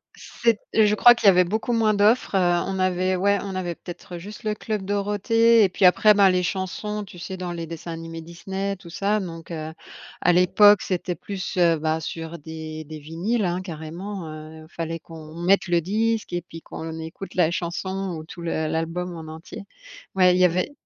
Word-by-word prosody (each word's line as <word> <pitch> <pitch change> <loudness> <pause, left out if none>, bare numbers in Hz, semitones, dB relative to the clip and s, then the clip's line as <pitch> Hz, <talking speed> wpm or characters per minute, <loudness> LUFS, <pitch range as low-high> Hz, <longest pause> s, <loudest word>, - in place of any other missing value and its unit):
C'est 230 -3 0 0.2
je 210 -1 +4
crois 240 +3 +8
qu'il 235 -4 0
y - - +12
avait 180 -1 +6
beaucoup 220 +6 -2
moins 220 -2 +3
d'offres, 205 +1 +3
heu, - - +4 0.3
on 190 0 -3
avait, 185 0 +1
ouais, 200 +2 +2
on 195 -1 -5
avait 175 -2 -3
peut-être 175 +1 -9
juste 205 +5 -10
le 215 -1 -1
Club 210 -2 -3
Dorothée 210 +3 +3
et 190 - +3
puis 185 +1 +1
après, 210 +4 +6
ben, 200 -1 +6
les 180 0 +2
chansons, 205 +3 -3
tu 180 -3 -12
sais 190 +3 -6
dans 180 -1 -4
les 170 -1 -5
dessins 165 +1 -7
animés 165 0 -7
Disney, 190 +4 -4
tout 175 - -13
ça. 200 +5 0
Donc 165 -3 -7
heu, 160 -1 -5 0.5
à 180 - +4
l'époque 190 +3 +6
c'était 180 -1 -2
plus, 190 -1 -6 0.2
bah, 160 0 0
sur 165 +1 -6
des 155 0 -7
des 155 0 -8
vinyles, 180 +9 -1
hein, 175 +1 -1
carrément 175 +3 -6 0.3
il 160 0 -12
fallait 165 0 -4
qu'on 160 -1 -12
mette 185 +3 +2
le 175 -1 +2
disque 220 +4 -1
et 175 - -1
puis 165 -1 -11
qu'on 160 0 -7
écoute 160 +4 -8
la 170 -3 +3
chanson 185 +2 -3
ou 155 - -7
tout 170 +2 -11
l 160 -2 -2
l'album 165 +2 -2
en 160 -1 -8
entier. 160 +4 -9 0.5
Ouais, 185 -1 +5
il - - +1
y 185 - +6
avait 180 - +1
180 Hz, 200 wpm, -24 LUFS, 165-200 Hz, 0.5 s, y